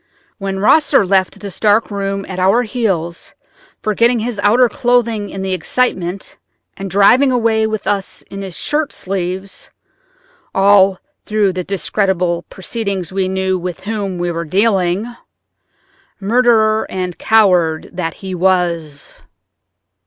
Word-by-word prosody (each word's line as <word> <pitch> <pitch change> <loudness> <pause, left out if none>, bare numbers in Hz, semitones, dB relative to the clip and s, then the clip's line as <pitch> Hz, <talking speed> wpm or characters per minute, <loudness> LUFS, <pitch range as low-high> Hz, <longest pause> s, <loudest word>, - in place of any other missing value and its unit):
When 195 -1 -3
Rosser 275 +3 +4
left 190 0 +1
this 200 -2 -7
dark 215 +1 +2
room 195 -1 -3
at 185 -1 -6
our 195 +7 +3
heels, 190 -8 -3 0.5
forgetting 230 +3 +2
his 225 -1 -3
outer 235 +5 +4
clothing 235 -4 0
in 195 - -6
the 190 -1 -1
excitement, 185 -1 -2 0.4
and 195 0 -6
driving 240 +8 +4
away 225 -3 +2
with 215 -1 -4
us 200 -2 -2
in 195 - -9
his 190 -3 -6
shirt 300 0 -1
sleeves—all 195 - -1 0.3
through 210 -3 +1
the 180 0 -3
discreditable 185 -3 -1
proceedings 195 -3 -4
we 190 -1 0
knew 190 0 -1
with 180 0 -5
whom 200 -2 -3
we 175 0 -1
were 170 0 -3
dealing, 190 +2 +1 1.1
murderer 220 0 +2
and 180 -2 -4
coward 180 -7 +2
that 170 -2 -3
he 190 - -4
was!" 170 -5 -1
195 Hz, 125 wpm, -16 LUFS, 185-220 Hz, 1.1 s, Rosser